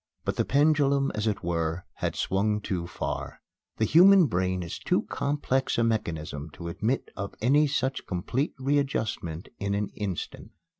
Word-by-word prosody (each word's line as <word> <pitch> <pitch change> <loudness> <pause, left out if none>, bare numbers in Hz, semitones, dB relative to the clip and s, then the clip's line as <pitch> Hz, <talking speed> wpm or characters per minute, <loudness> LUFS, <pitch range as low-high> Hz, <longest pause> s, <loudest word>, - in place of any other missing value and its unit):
But - - -1
the - - +2
pendulum, 140 -1 +3
as 105 +1 -1
it 105 - -1
were, 85 0 -1
had - - -2
swung 105 +2 +1
too 90 -4 -3
far. 95 - -4 0.4
The 110 - +2
human 185 - +7
brain 95 -5 0
is 85 - -6
too - - +1
complex 140 -2 -1
a 115 - +3
mechanism 80 -9 -2
to 85 -1 -6
admit 110 +10 -1
of 100 0 -5
any 145 +7 +4
such 135 -1 -1
complete 120 - -2
readjustment 130 - -1
in 100 0 -1
an 105 0 -1
instant. 100 -5 -5
105 Hz, 155 wpm, -27 LUFS, 90-140 Hz, 0.4 s, human